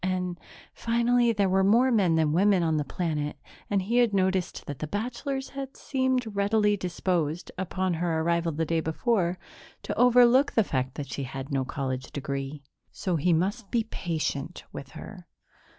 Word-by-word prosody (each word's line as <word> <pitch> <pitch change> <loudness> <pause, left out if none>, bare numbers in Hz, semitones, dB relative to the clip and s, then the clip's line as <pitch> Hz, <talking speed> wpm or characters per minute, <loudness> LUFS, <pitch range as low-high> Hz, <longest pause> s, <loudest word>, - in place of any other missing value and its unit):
And, 180 -1 -1 0.3
finally, 235 +1 +2
there 205 -3 +2
were 190 +1 +3
more 235 +6 +4
men 190 -8 +3
than 155 -2 +2
women 190 +1 +4
on 160 -2 +1
the 150 - +1
planet 150 -1 -3 0.3
and 200 -2 +1
he 230 +6 0
had 235 -4 +3
noticed 190 -1 0
that 145 -2 -6
the 155 - -3
bachelors 250 - -3
had 270 -1 -7
seemed 260 -5 -1
readily 210 +1 +3
disposed, 175 -3 -2
upon 185 0 -1
her 165 -1 0
arrival 170 0 +1
the 160 +2 -1
day 165 +1 +1
before, 175 +2 0 0.5
to - - -3
overlook 250 +2 +6
the 225 - +4
fact 130 -6 -2
that 145 - -6
she - - -3
had 135 +2 -7
no 135 -1 +1
college 130 -2 -4
degree. 140 +1 -4 0.3
So 185 -3 -2
he 165 +3 +2
must 195 +6 0
be 235 -2 +1
patient 165 -9 -3
with - - -8
her. - - -10
185 Hz, 170 wpm, -27 LUFS, 160-225 Hz, 0.5 s, overlook